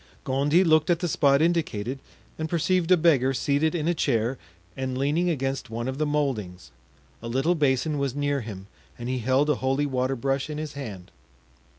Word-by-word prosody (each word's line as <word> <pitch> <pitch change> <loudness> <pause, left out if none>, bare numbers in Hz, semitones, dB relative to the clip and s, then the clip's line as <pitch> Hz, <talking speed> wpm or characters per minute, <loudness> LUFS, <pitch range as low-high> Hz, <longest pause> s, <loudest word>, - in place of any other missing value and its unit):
Gondy 145 +5 +2
looked 155 -2 +3
at 175 - +4
the 175 - -2
spot 140 -2 +3
indicated 140 -8 -1 0.4
and 160 0 -2
perceived 175 +1 +1
a 185 - +7
beggar 135 -6 +3
seated 145 +5 +1
in 160 -2 -1
a 175 - +3
chair 125 -5 0 0.4
and 130 -1 -3
leaning 150 +6 +1
against 135 -6 -2
one 115 +2 -4
of 130 +2 -4
the 155 - +1
moldings; 105 - -2 0.5
a - - -6
little 135 +9 +1
basin 145 -1 +1
was 140 -2 -1
near 145 -1 0
him 100 -4 -8 0.3
and 120 +1 -5
he 130 0 -1
held 130 +5 +2
a 150 - +2
holy 135 +2 +1
water 130 -1 -1
brush 135 +3 -1
in 150 - -4
his 155 -1 -5
hand. 105 -11 -8
140 Hz, 190 wpm, -25 LUFS, 130-155 Hz, 0.5 s, a